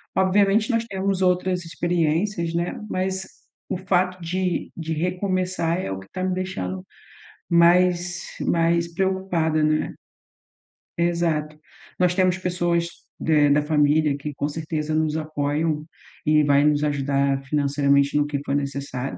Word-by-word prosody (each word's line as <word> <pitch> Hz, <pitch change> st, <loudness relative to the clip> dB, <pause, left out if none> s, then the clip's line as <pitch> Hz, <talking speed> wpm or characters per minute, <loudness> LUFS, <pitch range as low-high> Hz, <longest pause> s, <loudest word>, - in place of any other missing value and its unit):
Obviamente, 200 Hz, +3 st, +3 dB
nós 230 Hz, -1 st, 0 dB
temos 195 Hz, -2 st, -2 dB
outras 180 Hz, -1 st, +1 dB
experiências, 170 Hz, +1 st, 0 dB
né. 170 Hz, +1 st, -2 dB
Mas 190 Hz, +1 st, -2 dB, 0.4 s
o -, -, -1 dB
fato 185 Hz, -1 st, 0 dB
de 180 Hz, +1 st, -2 dB
de 160 Hz, -1 st, -3 dB
recomeçar 180 Hz, 0 st, -1 dB
é -, -, -4 dB
o 95 Hz, -, -3 dB
que 95 Hz, -, -13 dB
tá 185 Hz, -, -4 dB
me 185 Hz, -, 0 dB
deixando 95 Hz, -, -4 dB, 0.7 s
mais 175 Hz, +1 st, +3 dB, 0.2 s
mais 170 Hz, 0 st, +1 dB
preocupada, 180 Hz, -4 st, 0 dB
né. 155 Hz, 0 st, +1 dB, 1.0 s
Exato, 170 Hz, -3 st, 0 dB, 0.4 s
nós 180 Hz, -1 st, +3 dB
temos 185 Hz, 0 st, +2 dB
pessoas 175 Hz, -2 st, 0 dB, 0.3 s
de 150 Hz, -2 st, +3 dB
da 145 Hz, +1 st, +4 dB
família 150 Hz, -1 st, +2 dB
que 145 Hz, +1 st, -5 dB
com 145 Hz, -, -1 dB
certeza 155 Hz, 0 st, -3 dB
nos 155 Hz, 0 st, +1 dB
apoiam 155 Hz, 0 st, -1 dB, 0.4 s
e 150 Hz, 0 st, +4 dB
vai 145 Hz, 0 st, +4 dB
nos 150 Hz, 0 st, +2 dB
ajudar 140 Hz, -1 st, 0 dB
financeiramente 140 Hz, 0 st, +2 dB
no 145 Hz, 0 st, +2 dB
que 145 Hz, -1 st, -2 dB
for 140 Hz, -, -2 dB
necessário, 140 Hz, -2 st, -3 dB
165 Hz, 135 wpm, -23 LUFS, 150-180 Hz, 1.0 s, da